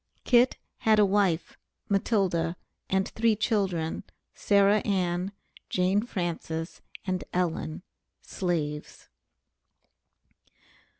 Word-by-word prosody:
Kit 245 0 +4 0.2
had 220 -1 +4
a 210 - +6
wife, 190 -4 +1 0.3
Matilda, 190 -5 +1 0.3
and 190 0 +1
three 225 -1 +2
children, 195 -6 0 0.3
Sarah 200 +1 +4
Ann, 185 -2 0 0.4
Jane 185 +3 +2
Frances, 165 -4 -4 0.2
and 185 -1 -1
Ellen, 170 -2 -1 0.4
slaves. 155 -5 -3
185 Hz, 80 wpm, -28 LUFS, 170-205 Hz, 0.4 s, a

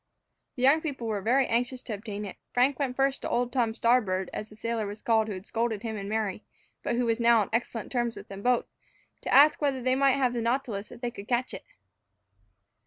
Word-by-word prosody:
The 250 - -4
young 285 +5 +6
people 280 -7 -4
were 215 -3 -2
very 255 +6 +3
anxious 245 +2 -1
to 225 - -4
obtain 210 0 -5
it. 195 - -8 0.2
Frank 260 +4 +3
went 265 -3 -1
first 270 0 +1
to - - -3
old 245 0 0
Tom 235 -4 +1
Starboard 215 -6 +2
(as 215 - -5
the 215 - -14
sailor 225 -1 -2
was 205 +2 -7
called 220 -1 +2
who 210 - -4
had 185 +1 -9
scolded 225 -2 -2
him 225 -1 -3
and 200 -1 -5
Mary, 215 -2 -2 0.4
but - - -1
who 245 0 +1
was 230 0 +1
now 235 -1 +5
on 200 - -4
excellent 230 -1 -2
terms 240 -2 0
with - - -10
both) 245 +1 +2 0.6
to - - -4
ask 295 +3 +6
whether 280 -3 +1
they 255 +1 +1
might 275 0 +4
have 255 -3 +1
the 240 - -1
nautilus 230 -4 -2
if - - -12
they 240 -1 -2
could 205 -3 -10
catch 245 0 0
it. - - -8
235 Hz, 230 wpm, -28 LUFS, 220-255 Hz, 0.6 s, young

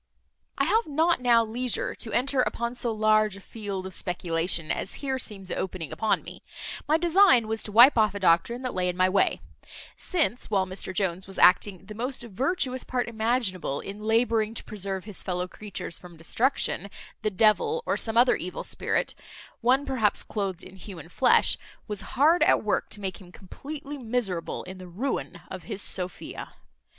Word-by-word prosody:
I - - +2
have 450 +1 +2
not 315 0 +2
now 235 -2 +4
leisure 240 +2 -2
to 225 - -5
enter 265 +1 +2
upon 235 -1 -1
so 240 -1 -2
large 215 -2 +2
a - - -10
field 200 -2 -6
of 190 - -7
speculation, 170 -2 0
as - - -2
here 265 -2 -2
seems 195 -6 -7
opening 180 -5 -4
upon 220 - 0
me; - - -10 0.5
my 310 +2 +4
design 345 - +5
was 220 0 -1
to 210 - -3
wipe 240 +4 +8
off 215 -2 +3
a - - -3
doctrine 190 +8 +2
that 255 - -3
lay 180 -1 0
in 180 - -4
my 185 0 +4
way; 190 +1 +2 0.5
since, 315 - -1
while 195 -3 +2
Mr 185 0 -4
Jones 185 -1 -1
was 195 - -10
acting 185 0 +4
the 210 - -8
most 245 +4 -4
virtuous 255 - -1
part 250 -1 -2
imaginable 220 - -1
in 200 +1 -7
labouring 225 0 +1
to - - -6
preserve 195 -2 -5
his 210 -3 -7
fellow 180 0 -2
creatures 200 -2 -6
from 175 -2 -13
destruction, 200 - 0 0.3
the 215 - +1
devil, 225 - +2
or - - +1
some 225 0 -1
other 245 +1 +6
evil 180 - -5
spirit, - - -1 0.5
one 260 +4 +3
perhaps 230 -6 +1
cloathed 195 -4 -3
in 185 +1 -12
human 180 -4 -10
flesh, 250 +6 +4 0.3
was 210 -2 -3 0.2
hard 315 +6 +5
at - - +4
work - - 0
to 205 - -4
make 190 -1 -4
him 180 -2 -14
completely 285 +10 -8
miserable 220 -8 -2
in 185 +1 -9
the 185 - -9
ruin 185 -2 -3
of 185 -2 -7
his 205 -3 -4
Sophia. 180 -3 -3
215 Hz, 180 wpm, -27 LUFS, 185-250 Hz, 0.5 s, wipe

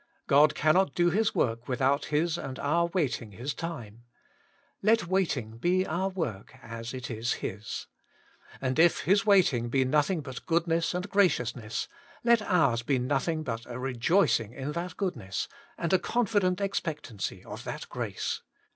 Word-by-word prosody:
God 150 +1 +5
cannot 155 +1 +3
do 175 0 +3
His 215 +5 +1
work 115 0 0
without 135 +2 +1
His 160 +3 +1
and 135 -6 -5
our 170 +4 +1
wait 165 -9 0
ing 110 -3 -11
His 130 +8 -4
time: 120 -11 -6 0.8
let 220 0 +3
waiting 145 - -1
be 185 +6 +2
our 185 +4 -1
work, 130 - -4
as 115 0 -6
it 130 -1 -6
is 115 +1 -1
His. 105 +2 -5 0.7
And 130 +1 -1
if 170 0 +5
His 200 +7 +2
waiting 150 - +4
be 130 +1 +2
nothing 150 +5 +2
but 130 -3 -8
good 170 0 +2
ness 165 +1 0
and 180 +2 -2
graciousness, 125 - +1 0.4
let 235 -1 +5
ours 155 - +2
be 130 +3 +1
nothing 145 +5 0
but 115 -4 -4
a 120 - -6
rejoicing 125 - +2
in 135 +3 -4
that 170 +2 -4
goodness, 125 - -2 0.3
and 170 +1 -1
a 185 - +5
confident 205 -5 +1
ex 195 0 0
pectancy 145 - -5
of - - -8
that - - -5
grace. - - -3
150 Hz, 165 wpm, -29 LUFS, 125-180 Hz, 0.8 s, God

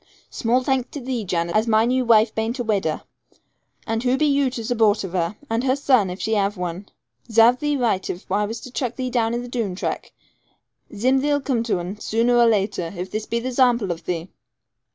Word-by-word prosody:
'Small 245 +2 +1
thanks 260 -2 0
to 290 - -7
thee, 250 -3 -3
Jan, 170 -2 -1
as 215 +4 +1
my 220 0 +4
new 255 +1 +1
waife 225 -2 +4
bain't 225 +3 -2
a 245 - -2
widder. 195 -8 -1 0.8
And 225 0 -1
who 250 +1 +1
be 305 - +2
you 280 -2 +2
to 250 -2 -6
zupport 220 -2 +2
of 190 - -5
her, 175 +2 -1
and 230 0 -1
her 260 0 +2
son, 255 -8 +3
if 180 +2 -6
she 220 - -1
have 205 -1 0
one? 180 +2 -5 0.4
Zarve 230 +3 +5
thee 295 0 0
right 220 -7 0
if 185 +1 -7
I 205 +2 +2
was 220 +2 -5
to 255 - -10
chuck 250 -1 -3
thee 255 -1 -3
down 230 -1 +1
into 240 - -3
the - - -7
Doone 225 -7 -2
track. - - -4 0.8
Zim 260 +5 +2
thee'll 290 0 +1
come 260 -4 0
to 220 -6 0
un, 180 +4 -6
zooner 230 +3 +1
or - - +5
later, 200 -5 0
if 180 +2 -5
this 215 0 -4
be 235 - -1
the 250 +2 -3
zample 245 -6 +2
of 165 - -6
thee.' 175 0 -3
225 Hz, 225 wpm, -22 LUFS, 200-250 Hz, 0.8 s, Zarve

